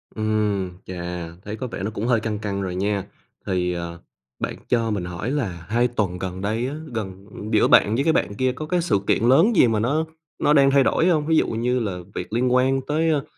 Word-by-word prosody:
Ừm, 105 -4 0
chà, 90 -1 -5 0.2
thấy 105 +1 -4
có 130 +2 -5
vẻ 95 - -6
nó 105 - -2
cũng 110 +3 -3
hơi 120 -3 +3
căng 110 -1 -3
căng 100 -2 -3
rồi 90 -2 -3
nha. 100 +1 -1 0.4
Thì, 90 -1 0
ờ, 85 0 -5 0.4
bạn - - -3
cho 115 -2 +1
mình 100 -4 -2
hỏi 90 +8 -4
là 95 - -3
2 120 +3 +3
tuần 100 -7 -2
gần 95 0 -5
đây 110 +5 -1
á, 140 - -4 0.2
gần 95 -3 -5 0.3
giữa 105 - +4
bạn 105 +2 +5
với 135 - +1
cái 160 - +3
bạn 100 - 0
kia 130 +3 +1
có 155 +4 -6
cái 175 +2 0
sự 165 - +1
kiện - - +2
lớn 135 - +5
gì 125 - +6
mà 110 -2 +1
nó 145 +8 +1 0.3
nó 150 - +3
đang 135 -2 +5
thay 140 -1 +5
đổi 165 - +2
hông? 155 -4 +2
Ví 160 -1 +3
dụ - - +3
như 125 +3 0
là 100 -6 -2 0.2
việc 90 +4 -5
liên 125 +1 +2
quan 130 +1 +3
tới, 160 +2 +1
ơ, 150 -3 +1
110 Hz, 240 wpm, -23 LUFS, 95-130 Hz, 0.4 s, gì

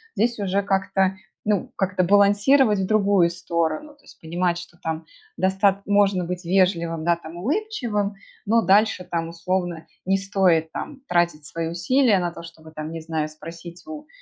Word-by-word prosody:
здесь 235 +1 +1
уже 200 -1 0
как-то, 195 -1 +1 0.3
ну, 205 -4 0
как-то 185 -1 +1
балансировать 205 +5 +4
в 190 - 0
другую 200 -4 +3
сторону. 170 - -2
То 290 - -29
есть - - -17
понимать, 175 +2 -1
что 175 0 -10
там 160 0 -4 0.3
достат 195 +1 +2
можно 200 -3 +2
быть 180 +1 -5
вежливым, 170 -3 +1
да, 170 0 +4
там, 165 0 -11
улыбчивым, 235 - -1 0.3
но 230 +2 +4
дальше 205 -1 +3
там, 165 -2 -3
условно, 175 0 -2 0.2
не 195 +1 +3
стоит 190 -5 +2
там 290 -3 -7
тратить 175 - +1
свои 165 +3 -4
усилия 210 +7 +3
на 175 -1 -1
то, 170 - -9
чтобы, 160 -1 -13
там, 155 0 -6
не 165 - -5
знаю, 160 -1 -2
спросить 165 +3 -11
у, 305 -1 -8
185 Hz, 165 wpm, -23 LUFS, 170-205 Hz, 0.3 s, балансировать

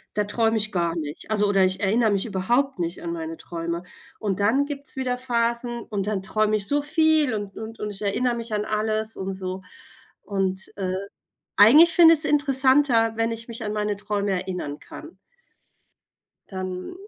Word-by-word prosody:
da 210 - +2
träume 225 +1 +1
ich 215 0 -1
gar 170 -2 0
nicht, 155 +5 -6
also, 210 -1 +3
oder 195 -1 +3
ich 185 0 0
erinnere 220 +2 +2
mich 195 -1 +1
überhaupt 235 +4 0
nicht 170 0 -3
an 170 0 -3
meine 165 -1 -5
Träume. 170 +1 -5 0.4
Und 200 -3 -2
dann 230 +8 +3
gibt's 285 -1 -7
wieder 250 -1 -1
Phasen 235 -1 -1
und 205 -1 -4
dann 205 -3 -1
träume 215 +1 +1
ich 200 -1 -3
so 290 +3 +2
viel 315 -4 +2
und 205 -2 -5
und 225 +1 -8
und 210 - -3
ich 200 - -8
erinnere 235 +4 0
mich 230 -1 -5
an 210 0 -1
alles 215 +1 -1
und 190 0 -3
so. 190 0 -5 0.6
Und, 190 -1 -2
äh, 185 -2 -2 0.6
eigentlich 295 +12 +8
finde 330 -1 +8
ich 310 - 0
es - - +1
interessanter, 265 -5 +3
wenn 225 0 0
ich 230 +1 -7
mich 230 0 -6
an 210 - -2
meine 210 -1 -1
Träume 205 -1 -2
erinnern 180 -6 -4
kann. - - -12 1.3
Dann 185 - -5
215 Hz, 185 wpm, -24 LUFS, 190-240 Hz, 1.3 s, eigentlich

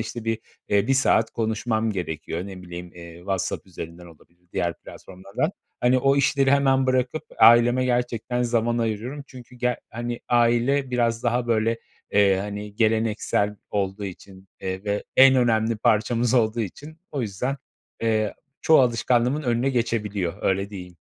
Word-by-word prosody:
işte, 115 0 -5
bir, 115 -1 -1 0.3
eee, 100 +1 +2
1 135 - +3
saat 115 -4 +3
konuşmam 110 0 -1
gerekiyor. 85 -1 -4
Ne 95 -2 -9
bileyim, 90 -1 -9
eee, 85 -1 -11
WhatsApp 95 +1 -3
üzerinden 85 -1 -9
olabilir, 85 +1 -19
diğer 85 -1 -1
platformlardan. 95 - -5 0.3
Hani, 125 +1 +4
o 135 +2 +3
işleri 140 -1 +2
hemen 135 -1 +3
bırakıp 130 +4 0 0.2
aileme 120 +2 +6
gerçekten 125 0 -1
zaman 120 0 +1
ayırıyorum. 115 +5 -3
Çünkü 125 -2 -13
ger 125 0 -1
hani, 120 +1 -4
aile 120 +3 +2
biraz 120 -2 0
daha, 120 0 0
böyle, 115 0 +1 0.3
eee, 100 -2 +4
hani, 105 +1 -6
geleneksel 110 -2 +1
olduğu 100 0 -2
için, 95 0 -10
eee, 95 +1 -4
ve 105 0 -2
en 135 0 +8
önemli 115 -2 +2
parçamız 115 +3 +1
olduğu 115 -1 +2
için 145 - -7
o 140 -4 -2
yüzden, 120 +7 -3 0.5
eee, 110 -2 +1 0.3
çoğu 160 -3 +6
alışkanlığımın 125 +3 +1
önüne 120 +1 +1
geçebiliyor. 105 -7 -1
Öyle 95 +1 0
diyeyim. 90 -3 -9
115 Hz, 150 wpm, -24 LUFS, 100-125 Hz, 0.5 s, en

